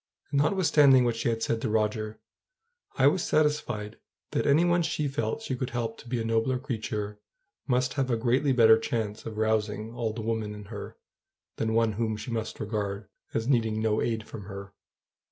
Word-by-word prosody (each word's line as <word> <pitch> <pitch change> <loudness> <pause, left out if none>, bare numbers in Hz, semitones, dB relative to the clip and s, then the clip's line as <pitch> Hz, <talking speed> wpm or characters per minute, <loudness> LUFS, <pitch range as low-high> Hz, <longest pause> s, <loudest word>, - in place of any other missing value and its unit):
And, 140 - +2
notwithstanding 150 -5 +5
what 120 -1 +1
she 115 +1 0
had 115 -1 -1
said 115 -1 0
to - - -1
Roger, 110 0 -1 0.8
I 130 - +4
was 160 +5 +4
satisfied 150 -9 0 0.3
that - - 0
any 150 +5 +5
one 175 0 +3
she 150 -2 -1
felt 135 - -2
she 130 - -2
could 125 0 -3
help 115 -2 -3
to - - -13
be 125 -1 -1
a - - -1
nobler 115 +3 +1
creature; 110 -5 -4 0.5
must 125 0 +1
have 135 -2 -1
a 120 - +2
greatly 130 +5 +2
better 115 -3 +6
chance 110 -1 -3
of 110 -1 -6
rousing 110 0 0
all 120 -2 -2
the 110 +1 -6
woman 110 -2 -2
in 105 -1 -9
her; - - -7 0.6
than 110 0 0
one 115 -1 +3
whom 110 0 -1
she 110 +3 -6
must 115 -1 -3
regard 105 -1 -3 0.3
as 115 +1 0
needing 115 -5 +2
no 110 -1 +1
aid 115 -2 -1
from 105 - -8
her. 100 0 -8
115 Hz, 190 wpm, -28 LUFS, 110-130 Hz, 0.8 s, better